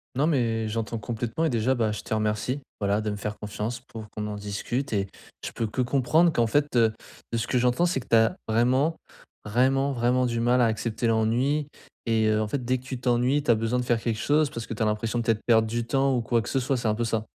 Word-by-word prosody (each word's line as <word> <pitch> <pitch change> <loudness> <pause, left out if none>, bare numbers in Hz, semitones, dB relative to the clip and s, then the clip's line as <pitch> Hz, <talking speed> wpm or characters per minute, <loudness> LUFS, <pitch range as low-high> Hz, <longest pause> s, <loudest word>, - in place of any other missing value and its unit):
Non, 145 +4 +2
mais, 115 -7 +1
j'entends 115 +1 -3
complètement 120 +6 -3
et - - +2
déjà, 120 +2 +1
bah, 115 -4 0
je 105 -1 -5
te - - -5
remercie, 110 +5 -1 0.2
voilà, 100 +1 +1
de 105 - -2
me 105 - -2
faire 105 +1 -4
confiance 105 +3 -4
pour 110 -4 -11
qu'on 105 0 -4
en 105 - -4
discute. 105 +5 -3
Et 100 -1 0 0.4
je - - -4
peux 115 - -2
que 110 +4 -2
comprendre 145 +7 +3
qu'en 120 -5 +2
fait, 145 +5 0
heu, 115 -2 +4 0.4
de 115 - 0
ce 115 - -2
que 125 - +1
j'entends, 125 +8 +2
c'est 170 - 0
que 120 - -12
tu 115 - +3
as 115 0 +4
vraiment, 130 +8 +2 0.5
vraiment, 130 +5 +2
vraiment 125 0 +1
du 115 -1 -2
mal 120 +2 +3
à 120 - +5
accepter 115 +1 -1
l'ennui. 120 +7 +1 0.4
Et, 110 -1 +2
heu, 110 0 +2
en - - -3
fait, 130 +4 -3
dès 130 +2 +1
que 125 - -14
tu 130 -1 -5
t'ennuies, 125 +3 +2
tu - - -7
as 120 - +7
besoin 115 +3 0
de - - -1
faire 120 -1 +1
quelque 115 -1 -2
chose, 150 +3 +2
parce 115 -1 -6
que 115 - -5
tu 110 - -1
as - - +2
l'impression 110 +2 -1
peut-être 115 -2 +1
de - - -29
perdre 110 -2 +4
du 120 +1 -2
temps 135 +1 +2
ou 120 - +1
quoi 115 0 0
que - - -6
ce 135 - +1
soit, 130 +1 0
c'est 120 -2 -2
un 105 - +2
peu 120 +1 -1
ça? 115 -1 -1
120 Hz, 265 wpm, -26 LUFS, 110-130 Hz, 0.5 s, as